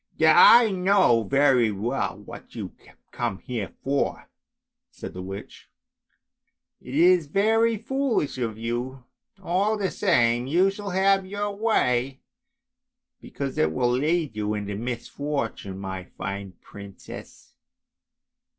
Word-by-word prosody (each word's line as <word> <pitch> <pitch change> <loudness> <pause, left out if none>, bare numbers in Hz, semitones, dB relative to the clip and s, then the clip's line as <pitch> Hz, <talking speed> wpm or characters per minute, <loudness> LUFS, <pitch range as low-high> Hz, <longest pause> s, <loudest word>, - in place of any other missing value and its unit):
" - - -36 0.4
I 230 -3 +1
know 185 -10 +3
very 130 -1 +3
well 115 +7 -2
what - - -12
you - - -6 0.2
have - - -20
come 115 -5 -3
here 115 -2 -5
for," 140 +1 -2 0.6
said - - -9
the 90 - -7
witch. 95 +2 -9 0.6
" - - -55
It 125 +2 -8
is 175 0 +4
very 225 +6 +2
foolish 240 - -1
of 115 -3 -3
you! 120 +3 -4 0.4
all 195 +5 +1
the 195 -2 -1
same 120 - +2
you 180 +7 +3
shall 200 0 -7
have 195 0 +2
your 205 +1 -3
way, 135 - 0 1.0
because 135 -2 -5
it 80 0 +2
will 120 +8 +1
lead 150 0 0
you 105 0 -2
into 100 -1 -4
misfortune, 120 -2 -4
my 95 -1 -6
fine 100 +1 -6
princess. 100 -1 -12
135 Hz, 125 wpm, -25 LUFS, -, 1.0 s, is